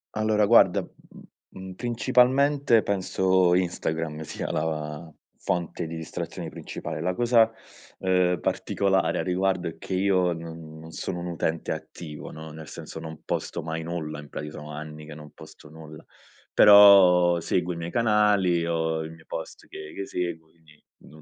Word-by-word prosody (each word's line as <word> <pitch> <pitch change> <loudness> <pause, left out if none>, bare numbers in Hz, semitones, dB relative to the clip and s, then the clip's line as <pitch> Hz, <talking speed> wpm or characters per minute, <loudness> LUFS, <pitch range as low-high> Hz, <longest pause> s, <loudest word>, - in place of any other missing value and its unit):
Allora 110 -1 +2
guarda, 115 +3 +4 0.6
mhmm, 95 0 -9
principalmente 125 +3 +3
penso 95 -2 +1
Instagram 80 -3 -2
sia - - -5
la 75 0 -4 0.2
fonte 85 0 -3
di 80 +1 -6
distrazioni 80 -1 -6
principale. 75 - -7
La 90 +2 0
cosa, 115 +1 +3 0.5
ehm, 90 -2 +2
particolare 95 -2 0
a - - -1
riguardo 90 -1 0
è 80 - -7
che 95 - -7
io 95 -2 +2
non 80 -1 -9
non 80 +1 -11
sono 90 +3 -5
un 85 - -5
utente 80 -1 -2
attivo, 75 -4 -9
no, 80 0 -9
nel 80 -1 -10
senso 80 - -9
non 80 -1 -9
posto - - -3
mai 80 0 -4
nulla, 80 -3 -5
in 75 - -14
prati 75 - -6
sono 75 0 -9
anni 75 0 -8
che 80 - -10
non 75 -1 -12
posto 75 - -15
nulla, 75 -1 -12 0.5
però 95 -4 +7
seguo 90 +1 -1
i - - -8
miei 85 +1 -5
canali, 105 -7 +2
ho 80 -1 -1
i 80 - -7
miei 80 -1 -15
post 80 - -8
che 75 0 -10
che 100 - -5
seguo 80 -3 -4
quindi 80 -2 -24 0.2
non 75 0 -16
85 Hz, 160 wpm, -25 LUFS, 80-95 Hz, 0.6 s, però